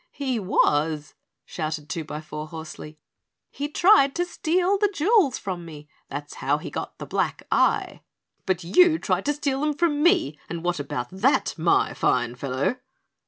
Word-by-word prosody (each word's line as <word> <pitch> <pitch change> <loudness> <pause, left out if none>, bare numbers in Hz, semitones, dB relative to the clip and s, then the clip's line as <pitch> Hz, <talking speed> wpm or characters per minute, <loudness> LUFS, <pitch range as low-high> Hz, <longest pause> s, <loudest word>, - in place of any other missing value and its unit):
"He 260 -5 -2
was," 155 -5 +1 0.3
shouted 155 -2 -4
Twobyfour 155 -2 -6
hoarsely. 160 -1 -9 0.5
"He 290 +1 -4
tried 325 -4 +5
to 350 - 0
steal 360 +3 0
the 415 -1 +2
jewels 365 - +3
from 185 -3 -5
me. 150 -3 -11 0.2
That's 145 +1 -6
how - - +2
he - - -8
got - - -5
the - - -7
black - - -2
eye." - - +1 0.5
"But 185 -2 0
you 320 - +5
tried 185 - -1
to 295 - +2
steal 280 -2 -2
them 300 0 0
from 295 -2 +1
me, 155 - +3
and 170 0 -5
what 175 -2 -1
about 125 -3 -4
that 205 +9 +1
my 170 +1 +2
fine 120 -1 +1
fellow?" 135 - -2
185 Hz, 160 wpm, -24 LUFS, -, 0.5 s, tried